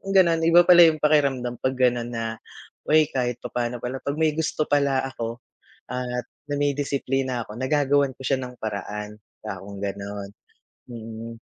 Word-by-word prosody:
Kung 195 0 -4
ganun, 170 -3 +5
iba 175 +1 +7
pala 175 -1 +8
yung 155 -1 +1
pakiramdam 135 -5 +2
'pag 130 0 -1
gano'n 125 -2 +2
na, 115 -1 -4 0.5
"Uy, 155 0 +4
kahit 125 -2 -2
papaano 120 0 -3
pala 130 +2 -3
'pag 140 - -3
may 160 -1 +2
gusto 155 -1 0
pala 140 -2 +2
ako 115 -1 -5 0.5
at 125 -1 -3 0.2
nadidisiplina 135 -3 -1
ako, 105 - -9
nagagawan 140 +1 +2
ko 135 - -17
siya 135 - +2
ng 125 -1 -9
paraan." 105 0 -5 0.3
Kakong 100 -1 -7
gano'n. 100 0 -5 0.6
Mm. 115 0 -8
125 Hz, 150 wpm, -24 LUFS, 115-145 Hz, 0.6 s, pala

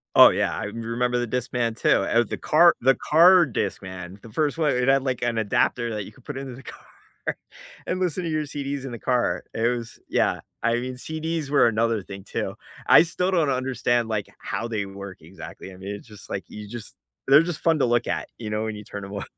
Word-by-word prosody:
Oh, - - +10
yeah, - - 0
I - - -3
m 115 +3 -6
remember 120 +2 0
the - - -3
Discman 120 -1 -1
too. - - +2
Uh, 115 +4 +3
the - - -4
car 170 +3 +5
the 135 +2 +5
car 175 +3 +6
Discman, 95 - -5
the 115 - -12
1st 150 +5 0
one, 155 -3 +2
it 125 0 0
had, 135 0 +4
like, 130 -2 -2
an 120 -1 0
adapter 115 +2 +1
that 105 -1 -3
you - - -11
could 125 +3 -22
put 145 -2 -6
into 135 -2 -6
the 135 - -12
car - - -11 1.0
and 185 - -1
listen 180 -1 -1
to 170 - -2
your 155 -1 0
CDs 140 -1 -4
in 135 - -6
the 120 - -5
car, 125 0 0
it 115 +1 +1
was 120 -2 -3
yeah. - - +1 0.2
I 115 0 +3
mean, 125 +1 -3
CDs 160 +2 -4
were 145 - +5
another 115 -1 +1
thing, 100 0 -9
too. - - -3 0.3
I - - +8
still 180 +2 -1
don't 165 -6 +2
understand, 125 -3 0
like, 105 -3 -2
how 115 - -3
they 110 -3 -2
work 100 -1 -9
exactly. 95 +3 -10
I - - -13
mean, 100 +2 -6
it's 105 - -12
just, 105 -5 -13
like 95 -3 -4
you 105 0 -8
just 115 0 -9 0.3
they're 140 +4 +7
just 170 -2 -4
fun 165 -2 +3
to - - +3
look 120 0 +1
at, - - -2
you 110 -3 -5
know, 105 +1 -1
when 110 -1 -3
you 105 - -8
turn 100 0 -8
them 100 +1 -8
on. 100 - -4
120 Hz, 235 wpm, -24 LUFS, 105-140 Hz, 1.0 s, Oh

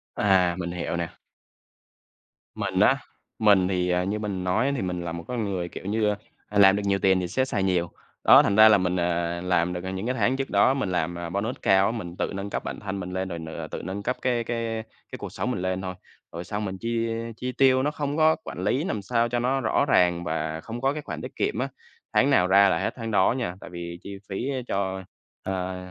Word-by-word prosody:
À, 95 -4 +3
mình 85 -1 -3
hiểu 85 -1 -3
nè. 85 -1 -3 1.4
Mình - - -2
á, - - +5 0.4
mình 100 -4 +5
thì, 90 -1 0
à, 90 0 +2
như 105 +3 -2
mình 100 -3 -3
nói 110 +10 +1
thì 125 - -2
mình 90 -1 -2
là 85 - -3
một 85 0 -6
con 120 -3 -2
người, 95 -4 -2
kiểu - - -9
như, 105 +1 +1 0.4
ơ, 105 -1 +1
làm 95 -1 +7
được 105 - -1
nhiều 100 -1 +2
tiền 95 0 +3
thì 90 - -2
sẽ 130 +8 0
xài 100 -7 -1
nhiều, 90 -3 +1 0.3
đó, - - +8
thành 100 - +1
ra 110 0 +9
là 105 - +7
mình 90 -1 0
à 85 0 -1
làm 90 -1 +1
được, 90 0 -5
à, 95 - -4
những 95 +3 -4
cái 125 +1 -1
tháng 130 0 +2
trước 135 - -3
đó 100 +6 +4
mình 135 -9 -1
làm, 85 0 -1
à, 85 -1 -5
bonus 100 +7 -2
cao 95 0 +4
á, - - +1
mình 90 -7 -6
tự - - -1
nâng 100 +1 -4
cấp - - -3
bản - - -5
thân 100 -1 -4
mình 90 0 -5
lên 95 0 -2
rồi 85 -2 -5
n 80 - -8 0.2
tự - - -4
nâng 95 +3 -5
cấp 125 - -1
cái 120 -2 +1
cái 115 -1 -3 0.3
cái - - -5
cuộc - - -6
sống 125 - -2
mình 95 -7 -2
lên 95 0 -1
thôi. 95 -1 -5 0.4
Rồi 85 +1 -6
xong 105 +3 -3
mình 95 -1 -4
chi 115 +2 -1 0.3
chi 125 - -3
tiêu 130 0 +4
nó 150 - +1
không 145 0 -3
có 160 0 +5
quản - - -7
lý 125 +9 +1
làm 110 - -2
sao 115 +3 +1
cho 120 0 0
nó 130 +2 +1
rõ - - +2
ràng 90 -1 +3
và 80 0 -3
không 120 +2 -7
có 135 +1 +2
cái 150 - -4
khoản 85 - -6
tiết - - -8
kiệm - - -1
á, - - 0 0.5
tháng - - +4
nào 90 - +4
ra 100 +1 +6
là - - +2
hết - - -1
tháng 115 -2 -5
đó 95 0 +4
nha, 90 -8 -3
tại - - -9
vì 85 -1 -7
chi 100 0 -7
phí 100 +6 -3 0.2
cho, 95 -1 -2 0.4
ờ, 95 -1 -3
95 Hz, 250 wpm, -26 LUFS, 90-115 Hz, 1.4 s, ra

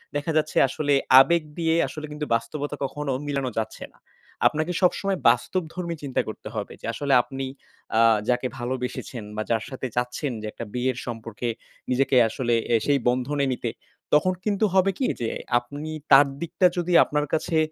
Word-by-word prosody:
দেখা 145 +3 -1
যাচ্ছে 155 - 0
আসলে 145 +2 0 0.3
আবেগ 170 +4 +4
দিয়ে 165 -1 +1
আসলে 150 +3 -7
কিন্তু 150 0 -4
বাস্তবতা 145 +6 -3
কখনো 145 +1 -4 0.2
মিলানো 140 -3 -1
যাচ্ছে 110 - -3
না। - - -26 0.5
আপনাকে 155 +3 -1
সবসময় 190 +1 +2
বাস্তবধর্মী 170 -1 -1
চিন্তা 135 -2 0
করতে 110 - -7
হবে 105 -2 -4
যে - - -8
আসলে 140 +2 0
আপনি, 135 +1 -5 0.5
আ - - +6 0.3
যাকে 125 +1 +1
ভালোবেসেছেন 125 -1 -4
বা 110 - -2
যার 115 -1 +1
সাথে 130 -1 -4
চাচ্ছেন 125 +3 -1
যে 110 - -5
একটা 115 - -7
বিয়ের 125 0 -1
সম্পর্কে, 115 0 -5 0.4
নিজেকে 135 +1 +2
আসলে 120 +1 -1 0.2
এ - - +6
সেই 140 -1 +3
বন্ধনে 135 +3 0
নিতে, 120 -1 -3 0.4
তখন 185 +5 +4
কিন্তু 210 0 +2
হবে 190 +1 +4
কি 265 - 0
যে 115 - 0 0.3
আপনি 145 +6 -7 0.2
তার 140 +1 +8
দিকটা 170 +2 +2
যদি 175 0 0
আপনার 150 0 -1
কাছে, 160 +1 0
140 Hz, 165 wpm, -25 LUFS, 125-155 Hz, 0.5 s, তার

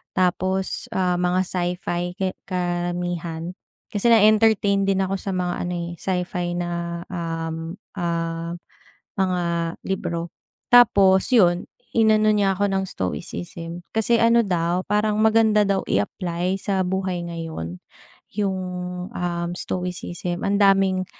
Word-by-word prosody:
Tapos, 185 +1 +1
ah, 180 -1 +1
mga 180 +1 +2
sci-fi 175 -1 -2
ki 190 -1 -1 0.2
karamihan. 175 -2 -2 0.4
Kasi 205 +2 +1
na-entertain 215 -2 +4
din 195 0 +2
ako 195 +1 -1
sa 195 - -4
mga 180 -1 -1
ano 180 - -3
eh, 170 -1 -3
sci-fi 180 -1 -2
na, 170 -1 -3
um, 165 -1 -4 0.2
ah, 165 -1 -2 0.6
mga 185 -2 +1 0.5
libro. 170 -3 -2 0.4
Tapos 200 -4 +6
yun, 175 -6 +4 0.3
inano 215 -1 +5
niya 205 -2 +3
ako 200 +2 0
ng 190 0 0
stoicism. 130 - -5
Kasi 225 +1 +2
ano 230 0 +5
daw 175 -1 0
parang 210 +1 +1
maganda 220 -1 +4
daw 195 -1 +1
i-apply 175 - -1
sa 190 -2 0
buhay 185 -1 -2
ngayon, 160 - -6 0.6
yung, 195 -2 0 0.5
um, 175 -5 -3
stoicism. 180 -1 -3
Ang 200 +1 +1
daming, 195 -1 +4
180 Hz, 120 wpm, -23 LUFS, 175-195 Hz, 0.6 s, Tapos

